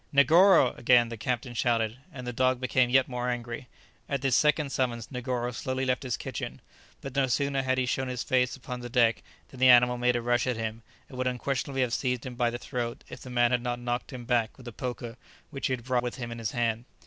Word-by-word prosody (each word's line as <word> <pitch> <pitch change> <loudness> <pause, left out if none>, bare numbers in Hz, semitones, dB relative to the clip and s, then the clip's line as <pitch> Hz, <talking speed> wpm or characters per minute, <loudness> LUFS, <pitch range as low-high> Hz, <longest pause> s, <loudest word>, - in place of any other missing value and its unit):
"Negoro!" 160 +1 +6
again 120 -1 +5
the 115 - -5
captain 120 +2 -3
shouted, 115 -1 0
and 125 -5 -8
the 125 - -4
dog 130 +1 +2
became 130 -1 +2
yet 130 +1 +4
more 125 -1 -3
angry. 120 0 -4 0.4
At 140 -2 -2
this 135 -3 +3
second 150 -2 +2
summons 120 -4 -2
Negoro 125 -1 -2
slowly 130 +2 -2
left 125 -1 0
his 125 -4 -2
kitchen, 65 - -6 0.4
but 135 -1 -7
no 135 -1 +3
sooner 140 +2 0
had 130 0 0
he 130 - +1
shown 130 +1 -1
his 125 -1 -3
face 125 -2 +1
upon 125 -1 -7
the 120 0 -7
deck 115 -2 +3 0.3
than 130 - -13
the 130 0 +6
animal 125 0 +6
made 125 0 +2
a 120 - 0
rush 120 0 +1
at 125 -3 0
him, 110 0 -4 0.3
and 130 - -10
would 130 - 0
unquestionably 135 +2 -2
have 125 -2 0
seized 125 -2 -1
him 130 - -5
by 120 -1 +1
the 120 - -4
throat 120 -1 -4
if - - -9
the 130 - -9
man 120 -1 +2
had 125 -1 +2
not 120 0 -2
knocked 120 +2 -3
him 125 -2 -8
back 115 -2 0
with 125 -2 -13
a 120 - -7
poker 120 0 -5 0.3
which 135 -2 -2
he 130 - -1
had 120 -2 -4
brought 125 0 +1
with 120 0 -4
him 120 -3 -6
in 115 - -6
his 110 -2 -2
hand. 115 -1 -1
125 Hz, 245 wpm, -28 LUFS, 120-130 Hz, 0.4 s, Negoro